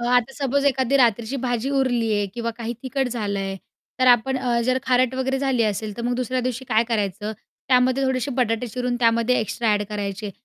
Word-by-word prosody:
आता 245 +1 +2
सपोज 280 0 0
एखादी 265 0 +2
रात्रीची 235 0 +2
भाजी 245 +1 -1
उरली 245 -5 +1
आहे 205 0 0
किंवा 235 -1 -2
काही 235 0 -3
तिखट 265 0 -1
झालंय 200 -5 -3 0.4
तर 255 - +4
आपण 245 +2 +4
अ, 240 -2 0
जर 255 +1 +2
खारट 255 -1 +2
वगैरे 265 +1 -1
झाली 265 -3 +1
असेल, 210 0 -2
तर 235 - -5
मग 245 +1 0
दुसऱ्या 255 +1 -1
दिवशी 255 +1 -3
काय 225 0 +3
करायचं 210 -1 -2 0.4
त्यामध्ये 255 +1 +3
थोडेसे 260 0 0
बटाटे 240 -1 0
चिरून 245 +2 -2
त्यामध्ये 230 +1 +3
एक्स्ट्रा 220 +1 -1
अ‍ॅड 205 0 +1
करायचे. 205 0 -4
245 Hz, 190 wpm, -23 LUFS, 220-260 Hz, 0.4 s, तर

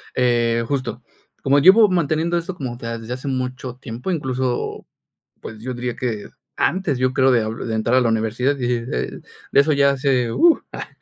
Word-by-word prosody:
eh, 120 -2 +2
justo, 130 -3 -3 0.4
como 140 +1 +4
llevo 200 +7 +7
manteniendo 170 0 +1
esto 175 +2 -4
como, 130 -6 -5
o 120 - -11
sea, 115 0 -4
desde 115 +1 -6
hace 135 +2 -8
mucho 130 -1 -3
tiempo, 125 +6 -6
incluso, 130 -5 -2 0.5
pues, 110 - -9
yo 130 +2 -4
diría 120 -1 -4
que 115 -5 -3 0.3
antes, 170 -8 0
yo 130 0 +1
creo, 130 0 +4
de 120 -3 +3 0.2
de 115 - -2
entrar 115 +3 +1
a - - +5
la 120 - +2
universidad 115 +5 0
y 120 -1 0
de 115 - -3 0.5
de - - +6
eso 150 +2 +2
ya 140 -1 +4
hace, 130 -3 +1
uh, 340 -1 +5
ah, - - -6
130 Hz, 190 wpm, -21 LUFS, 120-140 Hz, 0.5 s, llevo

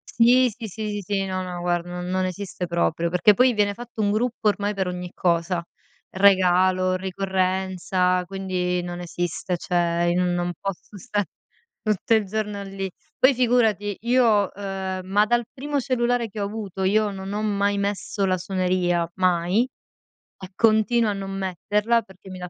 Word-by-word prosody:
Sì. 245 +2 +5
Sì, 225 +1 -8
sì, 215 +2 -5
sì, 205 0 -3
sì. 195 +1 -1
No, 185 -1 -2
no, 180 -1 -5
guarda, 175 0 -1
non 180 0 -5
non 185 0 0
esiste 185 -1 -4
proprio, 170 -1 0
perché 180 +4 +5
poi 250 +4 +4
viene 205 -1 +1
fatto 240 0 -7
un 205 0 +2
gruppo, 230 0 0
ormai, 205 0 +1
per 190 -2 -2
ogni 180 0 -5
cosa. 170 0 0 0.5
Regalo, 185 -1 +4
ricorrenza, 185 -1 0
quindi 180 -1 -2
non 175 0 -6
esiste, 175 +1 -3
cioè, 175 0 0
i - - +2
non 175 0 0
posso 195 +1 -6
sta 205 +2 -1 0.6
tutto 215 +1 +1
il 220 -2 +3
giorno 210 0 -3
lì. 195 -1 -5 0.3
Poi 260 - +6
figurati, 225 -5 +2
io 230 -4 +3
uhm, 190 -1 -4
ma 205 +3 +3
dal 240 +1 +2
primo 285 +2 -3
cellulare 245 -2 0
che 210 0 -7
ho - - 0
avuto, 200 -2 -5
io 210 +2 +2
non 195 0 -6
ho 210 +1 -2
mai 200 -1 +1
messo 200 0 -2
la 185 -1 +2
suoneria, 180 -2 0
mai, 180 +3 +2 0.8
e 190 - -8
continuo 225 0 +3
a - - -1
non 195 -1 -5
metterla, 205 +5 0
perché 190 -2 -16
mi 185 - -8
dà 180 0 -6
195 Hz, 170 wpm, -24 LUFS, 180-210 Hz, 0.8 s, Poi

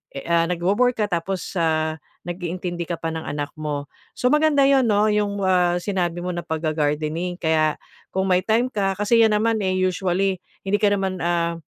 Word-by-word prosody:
e 140 - -5
a 170 0 +3
nagwowork 200 +8 +1
ka 205 - -1
tapos, 175 +1 -2
ah, 160 -1 +1 0.3
nag-iintindi 175 -1 -4
ka 170 - -2
pa 165 0 -4
ng 160 - -4
anak 145 -1 -3
mo. 145 -2 -3 0.3
So, 250 +2 +2
maganda 300 -2 +4
'yon 270 -3 +4
'no, 210 0 +3
'yong, 205 -1 0
ah, 180 -2 +3
sinabi 175 -3 -2
mo 180 - -2
na 175 - -3
pagga-gardening, 155 +2 -1
kaya 155 -2 +1 0.4
kung 190 0 +1
may 180 - +5
time 230 +5 +1
ka 195 -4 0
kasi 210 +4 +2
yan 220 -2 +5
naman 220 +1 +1
eh, 190 -2 0
usually 185 0 0 0.2
hindi 200 +1 0
ka 205 -1 +3
naman 190 -2 -2
ah, 170 0 0
180 Hz, 185 wpm, -22 LUFS, 165-205 Hz, 0.4 s, may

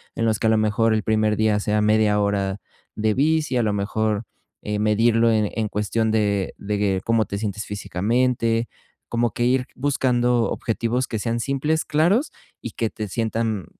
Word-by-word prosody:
en 115 - -1
los 110 -2 +1
que 110 - +1
a - - +4
lo 110 - +3
mejor 110 +1 +2
el 110 - -1
primer 110 -1 +1
día 110 -1 +2
sea 105 +1 0
media 105 -1 +3
hora 100 -1 0 0.4
de 110 0 +1
bici, 155 +1 +1
a 120 - +2
lo 105 -2 0
mejor, 105 +1 -1 0.4
eh, 105 0 -2
medirlo 115 +2 +3
en 110 -2 +1
en 110 -2 -1
cuestión 110 +2 -1
de 100 -3 0
de 100 -2 -1
cómo 115 -1 +2
te 100 - -5
sientes 105 -1 -4
físicamente. 115 +4 0 0.4
Como 120 -1 0
que 120 - -2
ir 125 +1 +2
buscando 125 -3 +1
objetivos 120 +3 -1
que 110 - -3
sean 115 +2 -2
simples, 145 +5 0
claros 180 - +2 0.3
y 120 - -6
que 115 +1 -2
te 105 0 -6
sientan, 110 -3 -2
110 Hz, 180 wpm, -22 LUFS, 105-120 Hz, 0.4 s, a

